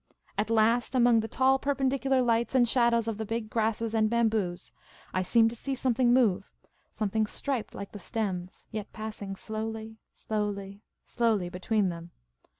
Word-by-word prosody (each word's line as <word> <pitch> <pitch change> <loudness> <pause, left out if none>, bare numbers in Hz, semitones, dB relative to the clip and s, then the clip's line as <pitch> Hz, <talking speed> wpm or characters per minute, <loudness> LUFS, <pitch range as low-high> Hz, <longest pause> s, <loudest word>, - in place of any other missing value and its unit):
At 210 +2 -1
last, 230 +3 +2
among 240 -2 +5
the 220 - -2
tall 265 +3 +3
perpendicular 270 -1 +1
lights 235 +1 +1
and 245 -2 +5
shadows 235 -1 +2
of 220 -2 -3
the - - -1
big 220 0 -4
grasses 225 0 0
and 215 -1 +3
bamboos, 220 -6 0 0.4
I 185 - +1
seemed 225 +4 +4
to - - -7
see 270 +4 -3
something 250 -1 +2
move 210 -6 +2 0.2
— - - -39
something 215 0 -1
striped 265 0 -3
like 200 0 -7
the 205 - -8
stems, 185 -3 -4
yet 215 -2 -5
passing 215 -2 -6
slowly, 220 +1 -5
slowly, 205 -2 -4 0.2
slowly 220 -7 +1
between 195 +2 0
them. 170 0 -7
220 Hz, 160 wpm, -29 LUFS, 205-235 Hz, 0.4 s, among